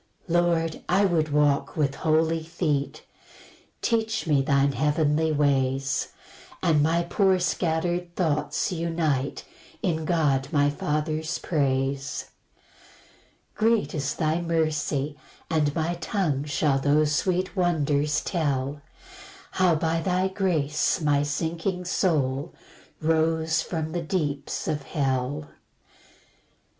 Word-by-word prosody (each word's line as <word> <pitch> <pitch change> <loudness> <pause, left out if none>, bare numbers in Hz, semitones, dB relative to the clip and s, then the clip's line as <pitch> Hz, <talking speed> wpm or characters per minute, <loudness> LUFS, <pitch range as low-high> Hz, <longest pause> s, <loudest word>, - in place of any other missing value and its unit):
3 175 - -2
Lord, 170 -2 +1
I 195 +3 +4
would 165 -4 +1
walk 145 0 +2
with 140 -3 +1
holy 160 +1 +1
feet; 160 -3 -2 0.8
Teach 225 -1 0
me 150 -4 +3
thine 140 0 +2
heavenly 150 +3 +1
ways, 135 -2 +1 0.6
And 160 -4 +4
my 165 +3 +2
poor 190 +2 +2
scatter'd 175 0 -1
thoughts 160 +2 0
unite 165 -5 -1 0.4
In 160 -4 0
God 145 -5 +1
my 145 -1 +3
Father's 155 +2 -2
praise. 135 -2 -1 1.2
4 220 - +1
Great 230 -4 +1
is 140 -4 -2
thy 160 +1 0
mercy, 155 -3 -1 0.3
and 150 -3 +1
my 165 +1 0
tongue 165 -4 -1
Shall 145 -1 +1
those 145 +2 +2
sweet 185 +5 0
wonders 150 -5 +1
tell, 145 -5 -1 0.7
How 185 -3 +3
by 165 +1 0
thy 185 +2 +1
grace 165 -7 0
my 145 -3 +2
sinking 165 +5 -2
soul 150 -5 0 0.5
Rose 160 0 +2
from 160 -2 -3
the 175 - -2
deeps 150 -5 -2
of 150 - -1
hell. 135 +1 -2
155 Hz, 110 wpm, -26 LUFS, 145-170 Hz, 1.2 s, I